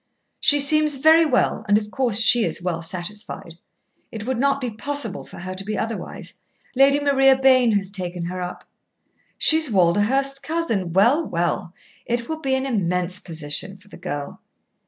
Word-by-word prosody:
"She 290 - +4
seems 300 0 +4
very 320 +4 +5
well, 255 -4 0
and 205 0 +4
of 210 0 -5
course 245 -6 0
she 230 +1 +6
is - - -2
well 175 -2 -3
satisfied. 175 -1 -7 0.5
It 215 -2 -7
would 255 -1 -2
not 275 +1 +1
be 250 -3 -4
possible 250 -2 -2
for - - -11
her 185 +1 -6
to 190 +1 -5
be 215 +1 -4
otherwise. 225 -1 -4 0.4
Lady 275 +2 +4
Maria 270 -2 +4
Bayne 255 -3 +4
has 195 -1 -1
taken 180 -3 -4
her 180 +1 -5
up." 180 0 -7 0.7
"She 315 - +4
is 315 -3 0
Walderhurst's 215 +9 +1
cousin. 275 - -2
Well, 235 - +3
well! 175 - -3 0.3
It 235 0 -2
will 315 0 -4
be 270 -3 0
an 265 0 -2
immense 180 -6 -1
position 165 +4 -4
for 205 +1 -21
the - - -12
girl." 145 -6 -6
220 Hz, 175 wpm, -22 LUFS, 185-275 Hz, 0.7 s, she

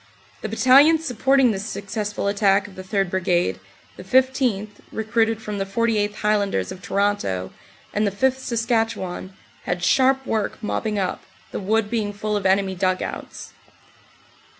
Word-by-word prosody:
The - - -4
battalions 295 +5 +5
supporting 265 0 +3
this 195 -2 -3
successful 205 0 -3
attack 200 -1 +2
of 200 - -14
the 185 - -8
3rd. 195 -1 -1
Brigade, 180 -1 +1 0.4
the - - -9
15th., 255 -6 +1
recruited 220 0 0
from 210 -1 -4
the - - +1
48th. 210 0 0
High 210 +1 +2
landers 195 - -1
of 185 - -9
Toronto, 195 - -1 0.4
and 210 0 +1
the - - 0
5th., 260 +7 +1
Saskatchewan, 225 -7 -2 0.3
had 175 0 -2
sharp 265 +6 +3
work 220 -3 -1
mopping 215 0 -2
up, 190 -2 -2 0.3
the - - -4
wood 210 +1 0
being 215 -3 -1
full 210 +1 -2
of 200 -2 +1
enemy 190 0 +2
dug 185 0 0
outs. - - -7
210 Hz, 150 wpm, -22 LUFS, 195-230 Hz, 0.4 s, battalions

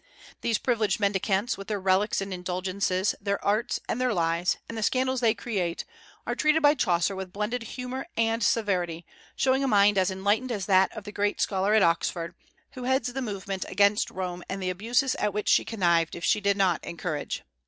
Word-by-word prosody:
These 230 -2 +1
privileged 220 -6 0
mendicants, 200 +2 0
with 195 - -8
their 210 -2 -2
relics 195 +2 +1
and 195 0 -4
indulgences, 185 +1 -1
their 200 0 0
arts 210 +4 +1
and 250 - -2
their 250 -4 +1
lies, 170 +1 +1
and 225 - -7
the 220 - -3
scandals 260 +4 +1
they 230 -2 +3
create, 185 -9 -3 0.4
are - - -1
treated 305 +1 +2
by 290 0 +7
Chaucer 190 - +1
with 190 -1 -6
blended 210 +5 -2
humor 250 +5 -6
and 225 0 +1
severity, 180 -7 0 0.3
showing 265 +1 +2
a - - +1
mind 205 -3 +4
as 185 0 +2
enlightened 205 +7 0
as 205 -5 -2
that 190 -1 +4
of 215 - -6
the 205 - -8
great 205 0 -1
scholar 195 +2 +1
at 215 - +5
Oxford, 170 0 0 0.4
who 250 -1 -7
heads 255 -1 0
the 270 - -3
movement 195 -4 -4
against 205 +1 +3
Rome 180 -1 -5
and 195 - -3
the 185 -1 -1
abuses 235 +7 +1
at 210 -1 -1
which 210 - -1
she - - +5
connived 170 -6 +1
if 170 - -5
she 210 - +2
did 200 0 +1
not 185 -4 +2
encourage. 165 -3 -4
200 Hz, 195 wpm, -27 LUFS, 185-230 Hz, 0.4 s, by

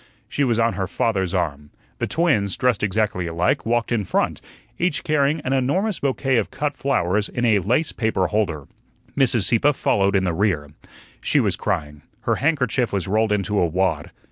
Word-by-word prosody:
She 140 - -1
was 120 -4 +1
on 115 0 +2
her 95 -2 -2
father's 100 -4 -1
arm. 75 -5 -2 0.3
The - - -1
twins, 120 - +1
dressed 125 -4 +1
exactly 105 -3 0
alike, 85 +6 0
walked 120 +1 0
in 115 -3 +1
front, - - -1 0.4
each 180 -3 0
carrying 150 +1 +1
an 135 -1 -2
enormous 180 +11 0
bouquet 135 -1 0
of 110 - 0
cut 145 0 -3
flowers 105 -7 0
in 120 -1 -2
a 110 -3 +4
"lace 125 - 0
paper" 110 -5 0
holder. 85 -8 -1 0.5
Mrs. 125 -6 +3
Sieppe 120 +8 +3
followed 100 -6 +1
in 95 - +3
the 90 -2 0
rear. 80 -6 0 0.5
She - - +2
was - - +1
crying; 75 0 -3 0.2
her 115 -2 0
handkerchief 125 -6 +1
was 95 -3 -2
rolled 110 +2 +1
into 105 0 0
a 85 - +3
wad. 95 +4 -1
110 Hz, 180 wpm, -22 LUFS, 95-130 Hz, 0.5 s, a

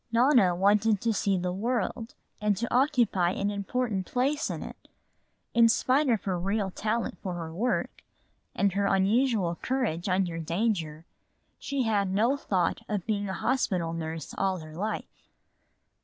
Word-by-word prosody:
Nona 235 -6 +4
wanted 205 +3 +3
to 230 -1 +1
see 200 -1 +1
the 180 0 -2
world 230 +2 -2 0.3
and 210 -2 +1
to 235 +4 -2
occupy 240 - +2
an 200 +1 -1
important 200 -1 -2
place 275 +4 0
in - - -4
it. - - -11 0.7
In 235 -1 +6
spite 265 +5 +2
of 225 -4 +1
her 185 -3 -1
real 195 +1 -1
talent 225 +4 -2
for 185 -3 -4
her 165 -2 -6
work 235 +8 -1 0.5
and 200 -2 +2
her 200 +1 +1
unusual 195 -2 +2
courage 220 -10 -1
under 185 -3 0
danger, 165 -3 -2 0.5
she 280 -2 -2
had 205 -4 +1
no 225 +8 +2
thought 185 -10 -1
of 205 -5 -2
being 205 -2 -1
a - - -2
hospital 190 -9 0
nurse 160 -2 -5
all 190 -1 +1
her 155 0 -11
life. 210 +5 -5
200 Hz, 155 wpm, -28 LUFS, 180-235 Hz, 0.7 s, In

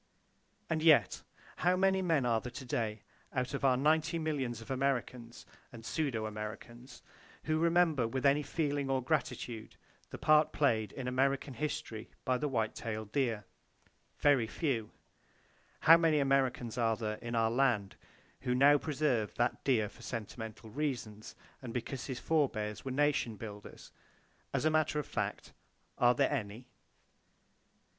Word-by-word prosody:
And 160 -1 -1
yet, 155 - +5 0.4
how 180 +1 +3
many 190 0 +3
men 165 -8 +2
are 115 -2 +2
there 125 - -6
to 130 +2 -8
day, 110 -3 -2 0.3
out 130 -1 -2
of 140 - -3
our 130 -2 +4
ninety 155 +4 +2
millions 140 -7 -2
of 115 - -9
Americans 125 -3 -2 0.3
and 115 -2 -11
pseudo 130 -9 -1
Americans, 110 +4 -8 0.4
who 155 0 0
remember 165 -6 +3
with 130 +3 -3
any 140 +2 +5
feeling 145 -2 -2
of 130 -2 0
gratitude 120 -3 -2 0.3
the - - -7
part 155 0 +4
played 110 -8 +1
in 130 -2 -6
American 135 +2 0
history 125 -4 -4 0.2
by 130 -1 +1
the 150 - 0
white 115 -5 -1
tailed 110 -2 -5
deer? 115 -7 0 0.7
Very 140 -6 +3
few! 115 -2 -2 0.9
How 165 +1 +8
many 165 -2 +3
Americans 135 -4 +1
are 115 -1 +2
there 110 -1 -3
in 120 0 -5
our 115 -1 +2
land 120 -6 +1 0.4
who 125 -1 -1
now 145 +3 +6
preserve 135 -9 0
that 120 0 0
deer 115 -6 +2
for 115 - -15
sentimental 115 -1 -7
reasons, 120 -7 -4 0.3
and 125 -3 -7
because 125 +2 -4
his 130 -3 -4
forbears 110 -10 0
were 135 - -4
nation 135 -4 +1
builders? 105 -1 -10 0.6
As - - -1
a 155 - +4
matter 155 -1 +1
of 150 - -1
fact, - - -4 0.5
are 120 0 +5
there 140 +3 +2
any? 115 -2 -4
130 Hz, 150 wpm, -33 LUFS, 115-145 Hz, 0.9 s, How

